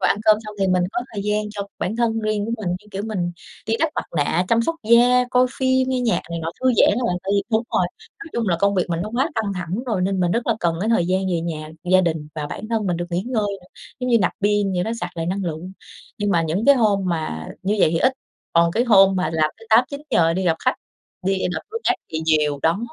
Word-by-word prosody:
Và - - +2
ăn - - +2
cơm 215 -1 +6
xong 210 0 -8
thì 195 - +2
mình 185 -1 +2
có - - -1
thời 205 -2 -4
gian 210 0 -1
cho 205 -1 -4 0.2
bản 200 +5 -2
thân 230 -1 +1
riêng 215 -1 -1
của 230 - -3
mình, 185 - -2
như 185 +4 -5
kiểu, 195 0 -4
mình 180 -5 -2 0.3
đi 225 - +1
đắp 325 - +3
mặt - - -2
nạ, 155 +4 +1
chăm 230 0 +3
sóc 330 - -1
da, 245 +2 +6
coi 250 0 +4
phim, 260 0 +2
nghe 260 -1 0
nhạc 240 -2 +1
này 170 - -3
nọ, 165 0 -3
thư 260 - 0
giãn - - +6
á 250 - -2
bạn. 180 - 0
Tại 190 - -3
vì 200 - +2
đúng 220 +1 +3
rồi, - - +2 0.3
nói 330 - -8
chung 230 -3 -1
là 170 - +2
công 200 0 +3
việc 180 -2 +2
mình 165 0 -1
nó 210 - -5
quá 265 +7 +1
căng 220 -3 -1
thẳng 180 +6 -4
rồi 215 -6 0
nên 190 0 0
mình 175 -1 +2
rất 235 +1 -1
là 230 - +2
cần 170 -1 +1
cái 210 - -1
thời 225 -7 +2
gian 185 +1 +1
về 170 -2 0
nhà, 155 -2 -5 0.2
gia 185 0 +6
đình 160 -4 -2
và 150 -2 -3
bản 215 +8 -7
thân 220 -3 0
mình 175 -2 0
được 175 +1 -3
nghỉ 175 +1 -1
ngơi 220 -5 0
nữa. 180 - -19 0.3
Giống 250 - -2
như, 235 - +5
nạp 180 - +1
pin 205 -1 +2
vậy 180 -1 0
đó, 225 - -3
sạc 175 - -3
lại 165 0 -2
năng 190 +2 -2
lượng. 170 +2 -5 0.5
Nhưng 205 0 0
mà 170 -3 +3
những 165 +7 -1
cái 280 - +8
hôm 215 -6 +2
mà 155 - -3
như 200 +3 0
vậy 155 - +5
thì 165 - 0
ít, 260 - +3 0.4
còn 170 0 +4
cái 235 +6 +1
hôm 195 -5 +6
mà 185 - 0
làm 155 -1 +2
tới 225 - -15
8:00-9:00, 245 - +3
đi 190 +1 -1
gặp 165 -2 +2
khách, - - +3 0.5
đi 195 +1 +1 0.2
gặp 160 - -2
đối 455 +1 -4
tác - - +3 0.2
thì 160 - -1
nhiều, 150 -2 +2
đó. 165 +3 +2
195 Hz, 280 wpm, -22 LUFS, 175-225 Hz, 0.5 s, cái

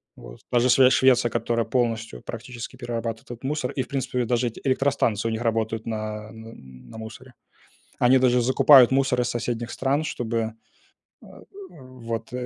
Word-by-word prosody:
вот. - - -13
Та 120 - +3
же 125 +2 +2
Шве 130 +1 +6
Швеция, 125 -3 +3
которая 115 0 -1
полностью 115 - -2
практически 120 0 -8
перерабатывает 115 -2 -5
этот 120 +1 -10
мусор, 140 -1 -2
и, 135 - -2
в - - -14
принципе, 125 -2 -2
даже 120 +1 0
эти 115 - -8
электростанции 130 -5 0
у - - -3
них 110 +1 -3
работают 115 -1 -1
на, 110 -1 -5
м, 110 0 -12
на 115 +1 -11 0.4
на - - -10
мусоре. 120 +4 -10 0.7
Они 130 +2 +5
даже 125 -1 +3
закупают 130 +1 +6
мусор 130 -2 +2
из 120 - -1
соседних 120 0 -3
стран, 140 +3 0
чтобы, 115 -6 -3 0.7
э, - - -15 0.4
вот 125 -5 -8
120 Hz, 170 wpm, -24 LUFS, 115-130 Hz, 0.7 s, Шве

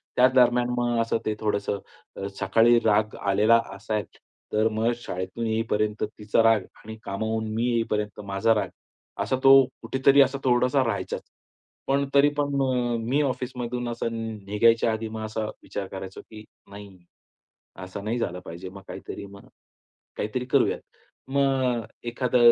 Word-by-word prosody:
त्या 125 +1 +6
दरम्यान 125 -1 +4
मग 120 -1 +1
असं 115 0 0
ते 110 - 0
थोडंसं 100 -2 -4
सकाळी 120 +1 +4
राग 110 0 +2
आलेला 105 +4 +4 0.2
असायच 105 -1 -4 0.4
तर 110 +1 +3
मग 110 +2 +1
शाळेतून 95 -1 -5
येईपर्यंत 110 -1 0
तिचा 105 +1 0
राग 115 -2 +5 0.2
आणि 110 +1 -8
कामावून 110 +3 -2
मी 115 +2 0
येईपर्यंत 105 -3 -1
माझा 100 +3 +2
राग, 105 - -1 0.5
असा - - 0
तो 135 0 +9 0.2
कुठेतरी 135 +1 +4
असा 135 0 +3
थोडासा 125 +1 +3
राहायच. 105 -3 -2 0.7
पण 140 +1 +2
तरी 140 +1 +6
पण 145 -1 0
अ, 125 -2 +1
मी 125 +6 +1
ऑफिसमधून 125 -2 -3
असं 120 0 -3 0.4
निघायच्या 115 +3 +3
आधी 110 0 -3
मग 110 0 -5
असा 110 0 -3 0.2
विचार 100 -1 -5
करायचो 95 0 -7
की 110 -1 -12 0.3
नाही, 100 -1 -11 0.9
असं 95 +2 -7
नाही 115 +3 -1
झालं 90 -6 -2
पाहिजे. 85 +3 -7
मग 100 +1 -11
काहीतरी - - -7
मग, 100 0 -14 0.7
काहीतरी 125 +4 -2
करूयात. 130 - +2 0.5
मग 135 -3 +1
अ, - - -11 0.2
एखादा 125 +1 +1
115 Hz, 145 wpm, -25 LUFS, 105-125 Hz, 0.9 s, तो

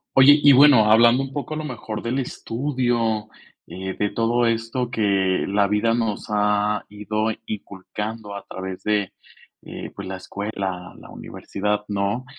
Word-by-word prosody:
Oye, 145 +3 +8
y 145 - +8
bueno, 130 -6 +7
hablando 120 +4 +6
un 135 0 -7
poco 150 +1 -4
a - - -4
lo 155 - -4
mejor 115 -6 -6
del 125 +3 -1
estudio, 120 -4 -1 0.4
eh, 95 +2 -6
de 105 - 0
todo 120 +1 +1
esto 115 +2 -1
que, 100 -5 +1
la 100 +1 +2
vida 105 +3 +1
nos 115 -3 -2
ha 105 0 +1
ido 105 +1 -2 0.2
inculcando 105 +1 -6
a 100 - -8
través 95 0 -7
de, 105 -3 0 0.5
eh, - - -8
pues, - - -7
la 95 0 -5
escuela, 95 -2 -5
la - - -14
universidad, 105 +1 -3
¿no? 100 +5 -2
110 Hz, 155 wpm, -22 LUFS, 100-120 Hz, 0.5 s, Oye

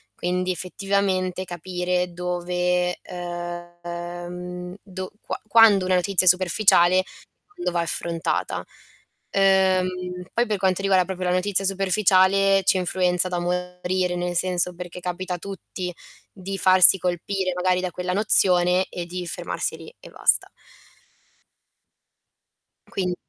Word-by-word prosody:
Quindi 180 +1 -2
effettivamente 185 0 -1
capire 180 0 -2
dove, 180 0 -1
ehm, 175 0 -7
dov 185 -1 -7
qua - - -5
quando 210 -3 +6
una 185 - +2
notizia 185 +1 +2
è - - +11
superficiale, 185 0 +4 0.4
quando 410 -4 -5
va 170 - 0
affrontata. 170 0 -2 0.7
Uhm, 185 -2 +1
poi 240 - +2
per 210 -2 -1
quanto 190 0 0
riguarda 190 -2 +3
proprio 185 -1 -3
la - - +1
notizia 195 +1 +1
superficiale 195 0 +3
ci - - +4
influenza 180 0 +1
da 175 -1 -2
morire, 180 +1 -2
nel 175 0 -3
senso 180 0 +1
perché 180 0 -8
capita 180 +1 -4
a - - -6
tutti 185 -1 -6 0.4
di 195 0 -6
farsi 185 0 +7
colpire 185 +1 -2
magari 180 0 +1
da 185 -1 -3
quella 180 +2 -4
nozione 185 -3 +3
e 175 - -5
di 180 +1 -6
fermarsi - - -4
lì 465 - -13
e - - -12
basta. - - +1 2.4
Quindi 180 -2 -2
180 Hz, 125 wpm, -23 LUFS, 180-190 Hz, 2.4 s, è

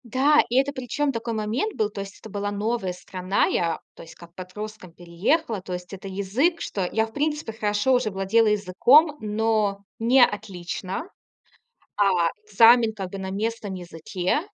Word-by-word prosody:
Да, 270 +5 +4
и 240 - -2
это, 275 +2 +3
причём, 275 +3 -1
такой 230 -1 -4
момент 220 - -2
был. 215 -3 0
То 200 - -5
есть 195 0 -9
это 220 - -11
была 205 0 -3
новая 205 -1 -1
страна. 185 +1 -1
Я, 165 -2 0
то - - -13
есть, 165 - -13
как 170 -1 -15
подростком 185 +1 -8
переехала. 195 - -1
То 185 0 -7
есть 180 +1 -7
это 195 0 -8
язык, 205 - 0
что 190 -3 -2
я, 220 0 +1
в 220 - -14
принципе, 295 -5 -2
хорошо 210 +3 +1
уже 250 -3 +2
владела 195 +3 +2
языком, 215 - +4
но 215 -2 0 0.2
не 245 +3 +5
отлично. 195 - -5 0.9
А 205 -1 +4 0.4
экзамен, 225 +2 +6
как 190 -3 -6
бы, 195 - -6
на 190 0 -5
местном 210 0 -3
языке. 180 - -2
210 Hz, 170 wpm, -24 LUFS, 190-235 Hz, 0.9 s, экзамен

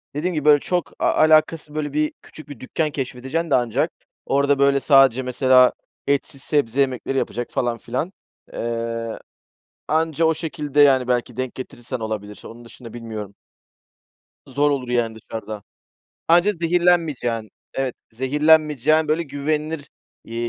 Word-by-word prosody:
Dediğim 175 +5 -1
gibi, 150 -3 -3
böyle, 150 -1 +7
çok 180 +3 -2
a - - +2
alakasız, 155 -1 +3
böyle, 145 -2 -3
bir 150 0 0
küçük 155 -1 -13
bir 145 -5 -9
dükkân 155 +4 -2
keşfedeceksin 135 +4 -3
de - - +5
ancak 120 -3 0 0.3
orada, 140 0 +2
böyle, 140 0 +4
sadece 135 -3 +5
mesela 125 0 +4 0.3
etsiz 140 -1 0
sebze 140 -5 0
yemekleri 135 0 0
yapacak 120 -2 -2
falan 120 -2 -1
filan. 130 +10 -4 0.4
Eee, 115 -1 -3 0.7
anca 160 +1 +1
o 160 - +4
şekilde, 150 -3 -1
yani, 135 -3 +5
belki 125 -1 -1
denk 130 -1 -3
getirirsen 125 -1 -6
olabilir. 105 -2 -5
Onun 120 +1 -11
dışında 115 0 -12
bilmiyorum. 110 -4 -7 1.1
Zor 145 +1 +1
olur, 130 -3 -2
yani, 120 -2 0
dışarıda. 110 -2 -8 0.7
Anca 175 +5 +5
zehirlenmeyeceğin, 165 - +1 0.2
evet, 135 -2 -2 0.2
zehirlenmeyeceğin, 150 +3 +3
böyle, 155 +2 +1
güvenilir, 150 +1 -3 0.4
eee, 115 - -10
140 Hz, 140 wpm, -22 LUFS, 120-155 Hz, 1.1 s, böyle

